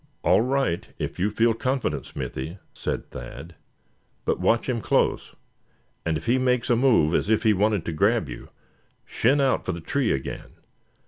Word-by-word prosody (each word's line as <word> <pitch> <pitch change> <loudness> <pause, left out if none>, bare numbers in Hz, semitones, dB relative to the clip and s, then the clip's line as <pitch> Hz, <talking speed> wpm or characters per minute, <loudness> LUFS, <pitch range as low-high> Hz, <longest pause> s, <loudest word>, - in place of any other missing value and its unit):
"All - - +4
right, 130 -8 0
if - - -4
you 100 +4 +2
feel 115 +2 +2
confident, 130 +3 -2
Smithy;" 80 +8 -5 0.2
said - - -4
Thad; 70 +7 -9 0.7
"but - - 0
watch 115 - +2
him 120 -3 -1
close; - - 0 0.7
and 80 -1 0
if - - -9
he 125 +3 +3
makes 125 -1 +1
a - - +5
move 115 - +3
as 90 - +1
if 110 0 +2
he 110 -2 +5
wanted 105 -2 +1
to 85 - -2
grab 100 +2 +2
you, - - -9 0.6
shin 135 +5 +2
out 135 -2 +2
for 95 - -2
the 85 - -5
tree 130 - 0
again. 65 -1 -4
110 Hz, 175 wpm, -25 LUFS, 85-125 Hz, 0.7 s, a